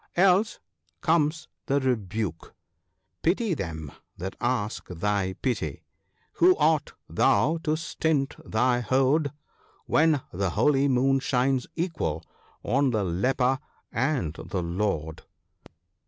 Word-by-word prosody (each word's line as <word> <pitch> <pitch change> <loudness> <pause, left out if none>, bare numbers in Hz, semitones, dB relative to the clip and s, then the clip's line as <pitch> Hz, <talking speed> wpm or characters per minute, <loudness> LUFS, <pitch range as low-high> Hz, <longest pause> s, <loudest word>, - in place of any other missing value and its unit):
Else 190 +4 +4 0.4
comes 160 -1 +1 0.2
the 140 +1 +2
rebuke 110 - -2 0.2
— - - -51
" - - -51
Pity 195 +4 +1
them 80 - -5 0.3
that 95 +2 -5
ask 120 -4 -1
thy 95 +1 -1
pity: 100 - -2 0.5
who 180 +1 +6
art 155 0 +2
thou 135 +11 +2
to 155 -2 0
stint 155 -4 -1
thy 120 +2 +1
hoard, 135 +4 +2 0.5
When 155 -3 +3
the 95 +1 0
holy 135 - +3
moon 135 +1 +3
shines 130 0 +1
equal 155 - -2 0.4
on 140 +1 +2
the 110 -4 0
leper 125 +9 +1 0.3
and 130 - 0
the 90 +2 -4
lord 85 -3 -2
130 Hz, 115 wpm, -26 LUFS, 100-150 Hz, 0.5 s, who